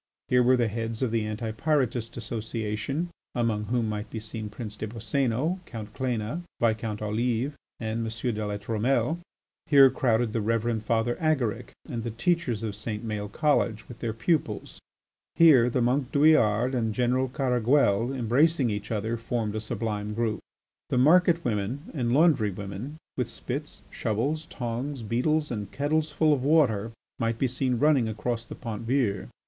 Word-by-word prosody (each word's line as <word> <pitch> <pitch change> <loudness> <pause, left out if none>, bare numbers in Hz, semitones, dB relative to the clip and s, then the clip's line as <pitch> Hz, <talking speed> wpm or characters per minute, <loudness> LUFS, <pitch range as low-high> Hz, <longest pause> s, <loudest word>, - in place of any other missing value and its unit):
Here 125 0 +5
were 125 +1 +5
the 120 -2 +2
heads 115 +2 -3
of 125 - 0
the 110 -2 0
Anti 110 +1 -3
Pyrotist 120 -3 0
Association, 115 +6 -3 0.3
among 115 -3 0
whom 120 +1 0
might 105 0 -4
be 110 - -5
seen 110 0 -6
Prince 105 0 -4
des 110 - -4
Boscénos, 130 - -1
Count 110 -3 -7
Cléna, 125 +4 -2 0.2
Viscount 110 -2 0
Olive, 120 +5 0 0.3
and 110 0 -2
M. 115 +2 -2
de 105 0 -3
La 105 0 -2
Trumelle; 115 +10 0 0.5
here 140 -4 +7
crowded 115 -3 +1
the 115 - 0
Reverend 115 +1 0
Father 115 +2 +1
Agaric 140 -9 0
and 115 - -4
the 120 - -3
teachers 120 -1 0
of 110 -2 -2
St. 105 +1 -5
Maël 105 -1 -3
College 115 -6 +1
with 120 -1 -11
their 115 - -2
pupils; 115 - -1 0.6
here 140 -8 +7
the 125 0 +1
monk 130 +2 +1
Douillard 130 -5 +4
and 115 -4 0
General 125 +2 +2
Caraguel, 125 -3 +2
embracing 135 +2 +2
each 105 0 -4
other, 110 +2 -1
formed 115 -2 -2
a 110 - -2
sublime 105 -1 -3
group. 115 -1 0 0.5
The - - 0
market 170 +4 +5
women 115 - -2
and 120 -6 -1
laundry 145 -6 +4
women 100 +9 -6 0.2
with 125 -2 -1
spits, 140 +5 -6
shovels, 140 +9 -1
tongs, 125 +2 -4
beetles, 150 +8 0
and 105 -4 -4
kettles 155 +2 0
full 155 0 +3
of 130 -3 -1
water 130 -8 +3 0.3
might 115 -1 0
be 130 - +1
seen 125 0 0
running 140 -4 +3
across 115 +2 -3
the - - -7
Pont 115 -4 -5
Vieux. 125 -6 +1
120 Hz, 165 wpm, -27 LUFS, 110-135 Hz, 0.6 s, here